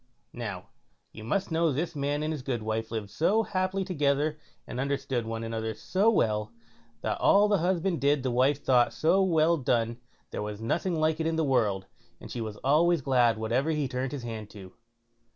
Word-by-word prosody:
Now, 100 -7 -6 0.4
you 110 - -10
must 190 - -1
know 165 0 +2
this 160 +5 -2
man 145 +1 -1
and 155 +1 -1
his 150 - -5
goodwife 110 -3 -2
lived 110 -3 -5
so 210 +8 +2
happily 190 -1 -1
together, 150 -3 0 0.3
and 125 - -6
understood 135 -3 -1
one 115 0 -4
another 110 -1 -3
so 195 - +1
well, 105 - +1 0.5
that - - -2
all 205 +1 +5
the 205 -2 +2
husband 175 0 0
did 140 -1 +2
the 130 - 0
wife 135 +4 +2
thought 125 -2 +3
so 175 +5 +3
well 170 -2 +3
done 120 -4 0 0.3
there - - -4
was 105 0 -5
nothing 165 +9 -1
like 155 0 +1
it 160 - 0
in 165 - 0
the 160 - +1
world, 110 -9 +1 0.3
and - - -10
she 120 - -4
was 110 -2 -5
always 160 +4 +3
glad 125 -4 +3
whatever 120 +7 0
he 150 -3 0
turned 130 0 -3
his 140 -4 -5
hand 110 -3 -6
to. 95 -3 -12
135 Hz, 190 wpm, -28 LUFS, 115-160 Hz, 0.5 s, all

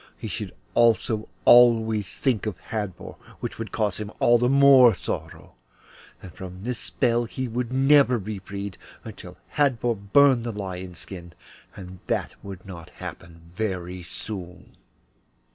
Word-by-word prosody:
He - - -6
should - - -6 0.2
also 115 -1 +3
think 110 - -11 0.2
always 110 -4 +4 0.2
of 100 -5 -4
Hadvor, 105 -6 -5 0.2
which - - -6
would 110 -4 -5
cause 105 -5 -1
him 105 -1 -5
all 120 0 +4
the 125 +1 +2
more 135 -3 +7
sorrow, - - -6 0.7
and 90 - -10
from 95 0 -9
this 125 +1 -3
spell 120 -2 0
he 130 +3 -5
should 120 0 -3
never 135 -1 +4
be 105 -1 -5
freed 100 0 -7 0.2
until - - -10 0.2
Hadvor 125 -5 +2 0.2
burned 140 -4 +5
the 120 - -3
lion's 95 -3 -6
skin, 85 -3 -9 0.4
and 90 -1 -10
that - - -1
would 95 -2 -9
not 85 -4 -10
happen 85 0 -11
very 90 -3 -3
soon. 90 +1 -8
105 Hz, 145 wpm, -25 LUFS, 95-120 Hz, 0.7 s, more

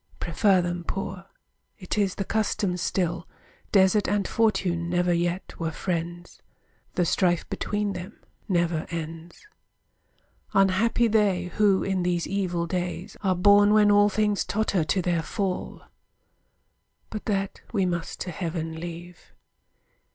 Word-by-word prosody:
Prefer 185 +2 +2
them 175 0 -3
poor. 195 +1 -5 0.5
It 185 - -4
is 200 -3 +1
the 195 - -3
custom 205 -3 0
still. 175 -1 -1 0.4
Desert 195 +1 +4
and 205 -1 0
fortune 180 -7 +1
never 175 0 +2
yet 175 +2 -1
were 165 -1 -1
friends; 175 +1 -4 0.5
The 175 - +2
strife 175 0 +1
between 205 -1 -1
them 185 +3 -8 0.3
never 170 -3 0
ends. 165 - -7 1.1
Unhappy 195 +5 +3
they, 195 -5 +1
who 205 -3 +3
in 190 -1 0
these 175 -1 0
evil 180 -4 -1
days 175 0 -4
Are 190 -3 +1
born 205 +3 +6
when 210 -1 +5
all 205 0 +5
things 210 0 +1
totter 200 -5 0
to 175 +5 0
their 170 -2 +1
fall! 185 +3 -3 1.3
But 215 - -6
that 195 -2 -2
we 195 -5 +1
must 175 -2 -3
to 180 - -3
heaven 165 -2 -4
leave. 175 +1 -9
180 Hz, 130 wpm, -26 LUFS, 175-200 Hz, 1.3 s, born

